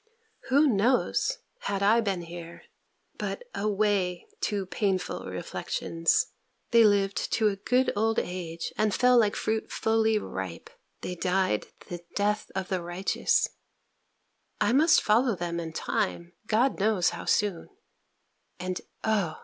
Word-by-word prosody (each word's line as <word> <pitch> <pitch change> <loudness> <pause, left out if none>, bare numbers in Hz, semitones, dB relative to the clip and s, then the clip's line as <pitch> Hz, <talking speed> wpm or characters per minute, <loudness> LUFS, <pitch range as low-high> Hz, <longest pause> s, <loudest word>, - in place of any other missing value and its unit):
Who 285 +4 +5
knows, 255 - +2 0.2
had 200 - -2
I 225 +4 +5
been 195 -5 -2
here 170 0 -9 0.6
But - - -3
away, 200 -3 0
too 200 -2 -1
painful 190 -1 -2
reflections 165 - -1 0.4
They 230 -1 +7
lived 200 -2 +2
to 215 -1 +3
a 200 - -3
good 250 +6 +1
old 225 +2 +1
age, 170 -2 -3
and 215 -2 +2
fell 250 0 +4
like 210 -3 +2
fruit 220 0 -2
fully 220 0 +2
ripe: 95 - -6 0.3
they 180 - -4
died 180 - 0 0.2
the 175 - -5 0.2
death 210 +1 0
of 190 -1 -3
the 185 -2 -1
righteous; 175 +3 +1 1.1
I - - +2
must 310 +5 +5
follow 230 +2 +3
them 170 -1 -3
in 165 -1 -5
time, 175 -1 -2
God 235 +4 +2
knows 200 -3 +2
how - - -7
soon; 205 -5 0 0.9
and, 185 0 -3 0.2
_Oh! 200 -8 0
200 Hz, 135 wpm, -28 LUFS, 180-220 Hz, 1.1 s, They